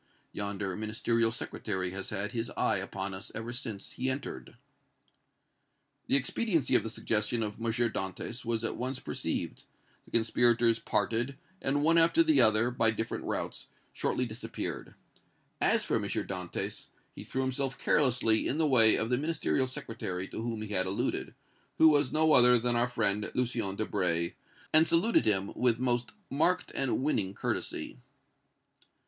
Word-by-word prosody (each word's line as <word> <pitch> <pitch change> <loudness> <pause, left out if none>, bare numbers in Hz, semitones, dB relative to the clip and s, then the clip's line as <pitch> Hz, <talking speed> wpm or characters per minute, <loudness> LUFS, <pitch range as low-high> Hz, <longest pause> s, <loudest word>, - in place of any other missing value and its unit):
Yonder 100 -2 -3
Ministerial 115 +2 0
Secretary 95 -5 -4
has 95 +1 -5
had 105 0 -3
his 120 -1 -3
eye - - +2
upon 95 0 -4
us 95 +2 -8
ever 115 +2 -5
since 110 -5 -5
he 130 +1 -2
entered." 130 - -6 1.5
The - - +3
expediency 160 - +1
of - - +6
the 115 - -5
suggestion 110 +1 0
of 105 +1 -5
M. - - -1
Dantès 115 0 -3
was 115 -1 -2
at 115 - -2
once 130 +2 -3
perceived; - - -3 0.4
the - - -18
conspirators 115 0 +3
parted 115 +5 -1 0.2
and 145 +2 0
one 165 +2 +5
after 170 - +5
the 315 -2 +4
other, 110 +2 +4
by 115 -2 +3
different 115 0 -3
routes, - - -4 0.3
shortly 125 - -1
disappeared. 110 0 -6 0.7
As - - +3
for - - 0
M. - - -2
Dantès, 90 -3 -4 0.3
he - - -9
threw 130 - -2
himself 130 0 -1
carelessly 125 -6 +2
in 140 - -1
the 160 - +2
way 115 -6 +6
of 115 +2 -1
the 125 - +2
Ministerial 150 -3 0
Secretary 95 -7 -5
to - - -6
whom 115 -2 -3
he 110 - -7
had 95 -2 0
alluded, 95 - -2 0.4
who 160 - +7
was 145 -3 +2
no 155 0 +3
other 125 0 +7
than 120 +1 0
our 120 +1 +2
friend 105 -3 -1
Lucien 120 -6 -1
Debray, 90 -5 -1 0.4
and 160 +1 +9
saluted 175 - +3
him 100 -2 +1
with 120 -2 +2
most 120 -1 0 0.2
marked 160 +6 +1
and 135 -1 0
winning 100 -10 0
courtesy. 60 - -3
115 Hz, 155 wpm, -30 LUFS, 105-130 Hz, 1.5 s, and